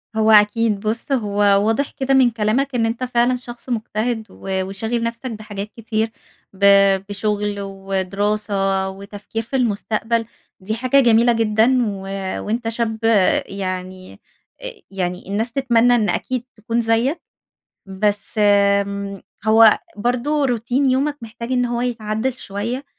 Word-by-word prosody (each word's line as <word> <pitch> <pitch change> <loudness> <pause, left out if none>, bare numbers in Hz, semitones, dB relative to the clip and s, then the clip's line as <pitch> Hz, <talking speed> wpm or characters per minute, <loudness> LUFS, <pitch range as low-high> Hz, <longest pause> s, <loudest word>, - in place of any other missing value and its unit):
هو 220 0 +3
أكيد 210 0 +4
بُصّ، 220 +6 -3
هو 210 -6 -1 0.3
واضح 225 +6 0
كده 270 -1 -1
من 260 -2 +5
كلامك 235 +5 0
إن 230 -2 +2
أنت 230 +3 -2
فعلًا 245 0 +2
شخص 245 0 -10
مجتهد 225 0 -2
و 190 -1 -3
وشاغل 220 +5 -3
نفسك 230 +2 -4
بحاجات 210 -1 -7
كتير. 225 0 -2 0.4
ب 200 +1 0 0.4
بشغل 205 0 -2
ودراسة 195 0 -1
وتفكير 200 +3 -7
في 230 - -6
المستقبل، 225 -1 0 0.3
دي 210 +3 -3
حاجة 255 +4 +2
جميلة 235 -1 +4
جدًا. 225 +3 +3
و 200 -2 -4 0.5
وأنت 225 +2 -2
شاب 225 -1 -2 0.5
يعني 185 -1 -6 0.4
أ - - -5 0.2
يعني 180 -2 -4
الناس 220 +4 -2
تتمنى 245 -2 +3
إن 215 -3 +1
أكيد 255 -2 -2
تكون 230 +2 -1
زيك. 230 +7 +1 0.7
بس، 205 +1 -1
آمم، 200 -1 +2 0.2
هو 220 0 +6 0.2
برضه 250 +7 0
روتين 250 +2 +1
يومك 280 +3 +1
محتاج 235 +2 -6
إن 250 -1 +2
هو 240 -1 -2
يتعدِّل 230 0 -2
شويّة. 235 +3 -5
220 Hz, 135 wpm, -20 LUFS, 205-240 Hz, 0.7 s, هو